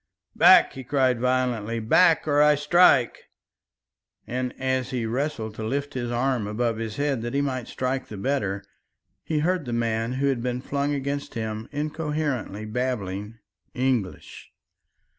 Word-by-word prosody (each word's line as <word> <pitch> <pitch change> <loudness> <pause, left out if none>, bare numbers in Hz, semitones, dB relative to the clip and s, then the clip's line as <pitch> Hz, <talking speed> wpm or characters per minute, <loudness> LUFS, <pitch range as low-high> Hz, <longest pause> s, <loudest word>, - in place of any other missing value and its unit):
"Back!" - - +7
he 135 - -8
cried 130 -2 +1
violently, 125 -3 0
"back, 160 +10 +4
or 145 -1 +3
I 150 0 +6
strike!" 145 -3 +4 1.0
and, 125 +1 -3
as 130 -1 -1
he 125 -3 -2
wrestled 120 -2 -2
to 110 - -7
lift 140 +5 -2
his 120 -2 -3
arm 120 -2 0
above 115 +2 -1
his 110 -1 -4
head 140 -4 -1
that 120 +3 -4
he 140 - +2
might 130 -4 -2
strike 130 +1 -2
the 105 - -8
better, 100 -4 -1 0.6
he 155 -2 -1
heard 175 -1 0
the 120 - -4
man 115 0 -1
who 135 +2 -1
had 135 -4 +1
been 125 0 -2
flung 140 +2 -1
against 140 0 -4
him 110 -1 -4
incoherently 150 -7 -3
babbling 110 -3 -3 0.4
English. 125 -7 -2
125 Hz, 150 wpm, -25 LUFS, 115-140 Hz, 1.0 s, Back